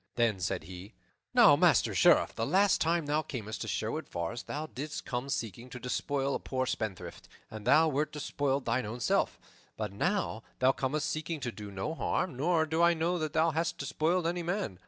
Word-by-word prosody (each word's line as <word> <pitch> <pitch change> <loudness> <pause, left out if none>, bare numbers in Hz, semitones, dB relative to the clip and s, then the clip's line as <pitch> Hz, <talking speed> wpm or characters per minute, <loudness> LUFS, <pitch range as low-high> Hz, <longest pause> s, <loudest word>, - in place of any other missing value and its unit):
Then 115 -5 +2
said 90 -1 -2
he, 95 +5 -10 0.4
"Now, - - +7
Master - - +4
Sheriff, - - +5
the 115 - -3
last 190 - +3
time 165 0 +1
thou 150 +2 +1
camest 110 -8 -6
to - - -4
Sherwood - - -2
Forest 85 +7 -4
thou 150 +2 -3
didst 150 0 -6
come 125 +2 -3
seeking 120 -1 -4
to 125 - -8
despoil 135 +2 -1
a - - -1
poor 130 -1 -2
spendthrift, 110 -6 -4 0.2
and 110 0 -8
thou 160 +5 +6
wert 150 0 0
despoiled 140 -2 -1
thine 120 -1 0
own 115 +3 -6
self; - - +1 0.4
but 105 -3 -3
now 180 - -1 0.2
thou 130 +1 +4
comest 145 +3 -1
seeking 155 +1 -3
to 120 -2 -2
do 105 -2 -8
no 100 +10 -3
harm, 175 0 -1
nor 160 +4 +2
do 160 +1 0
I 170 0 +5
know 170 +2 0
that 155 -2 -3
thou 160 +1 +3
hast 165 +2 -1
despoiled 155 +5 0
any 175 +1 0
man. 170 - -3
140 Hz, 200 wpm, -31 LUFS, 115-160 Hz, 0.4 s, Now